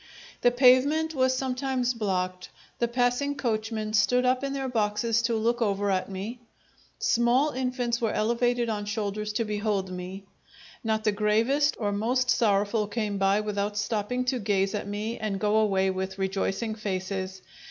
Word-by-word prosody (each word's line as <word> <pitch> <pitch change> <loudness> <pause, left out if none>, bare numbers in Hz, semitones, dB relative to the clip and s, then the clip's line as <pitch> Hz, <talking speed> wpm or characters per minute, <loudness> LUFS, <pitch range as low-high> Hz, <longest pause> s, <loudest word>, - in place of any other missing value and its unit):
The 245 - +6
pavement 265 +6 +4
was 260 -2 +2
sometimes 255 -1 -1
blocked; 185 -4 -2 0.3
the 235 - +2
passing 245 +4 0
coachmen 220 -3 -2
stood 250 +4 +3
up 255 +1 +2
in 275 0 -2
their 270 -1 -2
boxes 225 -1 +1
to 230 0 0
look 235 +2 0
over 205 -2 +1
at 185 0 -1
me, 200 +6 -5 0.6
small 245 +5 +2
infants 250 -2 -1
were 225 - +1
elevated 240 +2 +1
on 210 -2 -2
shoulders 210 0 -3
to 230 +2 0
behold 205 -2 -1
me; 185 +2 -6 0.6
not 220 -1 0
the 215 - +3
gravest 225 +8 +2
or 205 -3 0
most 245 +5 +1
sorrowful 205 0 +2
came 210 -2 -2
by 195 +2 +3
without 205 0 -2
stopping 215 +4 -1
to 250 0 0
gaze 195 -2 +1
at 205 -1 -3
me 210 +3 -4
and 210 -3 -2
go 210 +1 +2
away 195 -3 +2
with 190 0 -4
rejoicing 195 +3 -1
faces. 190 -2 -4
220 Hz, 160 wpm, -27 LUFS, 200-245 Hz, 0.6 s, The